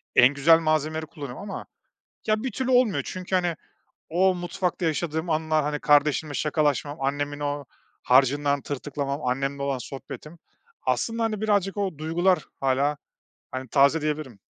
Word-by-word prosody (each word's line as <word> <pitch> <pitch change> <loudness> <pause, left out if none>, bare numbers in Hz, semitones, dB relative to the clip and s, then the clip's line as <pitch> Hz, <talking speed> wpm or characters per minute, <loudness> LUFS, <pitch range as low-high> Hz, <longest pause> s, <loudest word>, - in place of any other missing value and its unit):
en 125 +3 +7
güzel 160 +4 +6
malzemeleri 155 0 0
kullanıyorum 145 -4 -8
ama - - -6 0.6
ya, 215 +1 +1
bir 260 - -2
türlü 260 -1 -2
olmuyor. 245 -5 +4
Çünkü, 185 0 -3
hani, 175 -2 +1 0.6
o 185 +3 +3
mutfakta 180 0 -2
yaşadığım 160 +1 -1
anlar, 155 -1 +1
hani, 150 0 -1
kardeşimle 150 0 +3
şakalaşmam, 150 0 0
annemin 145 +1 -2
o 145 0 -2 0.4
harcından 140 +2 +3
tırtıklamam, 140 0 -4
annemle 135 +2 -1
olan 140 -1 -1
sohbetim, 140 +6 -9 0.4
aslında, 230 0 0
hani, 215 -2 -1
birazcık 205 -3 +1
o 195 -7 -2
duygular 175 +4 +2 0.2
hâlâ, 135 +2 +1 0.6
hani, 130 0 -5
taze 140 +5 +4
diyebilirim. 150 -7 -3
150 Hz, 140 wpm, -25 LUFS, 140-175 Hz, 0.6 s, en